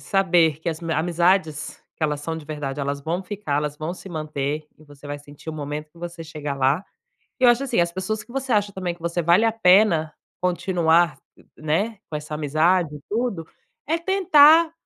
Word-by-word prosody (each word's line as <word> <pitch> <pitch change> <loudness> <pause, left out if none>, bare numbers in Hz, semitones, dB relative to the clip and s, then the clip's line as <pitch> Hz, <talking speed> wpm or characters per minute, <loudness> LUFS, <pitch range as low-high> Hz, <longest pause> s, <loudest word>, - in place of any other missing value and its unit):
saber 175 -6 +2
que 165 - -4
as 160 +1 -7
amizades, 165 -1 0 0.2
que - - -11
elas 150 -2 0
são 165 +2 -3
de 155 -2 -9
verdade, 145 -2 -4
elas 140 0 -3
vão 170 +5 -2
ficar, 190 -6 -3
elas 150 0 -2
vão 155 +3 -4
se 190 - -10
manter 155 -2 -3
e 155 - -18
você 145 -1 -14
vai 145 0 -5
sentir 145 +2 -10
o - - -7
momento 150 0 -5
que 170 - -20
você 170 -1 -7
chegar 150 -2 -5
lá. 135 +6 +2 0.6
E - - +3
eu 245 - +9
acho, 240 +2 +2
assim, 240 -8 +1
as 170 0 0
pessoas 200 +4 -3
que 240 - -15
você 265 -1 -2
acha 205 -1 +1
também 185 -2 -3
que 175 - -23
você 170 +1 -1
vale 170 +6 +4
a 225 - +3
pena 180 -7 +4 0.3
continuar, 175 -2 +2 0.4
né, 195 +9 -1
com 150 - -3
essa 150 0 -6
amizade 155 +2 +1
e - - -12
tudo, 215 -7 -2 0.4
é 325 +3 +1
tentar 335 -3 +5
165 Hz, 200 wpm, -23 LUFS, 150-195 Hz, 0.6 s, eu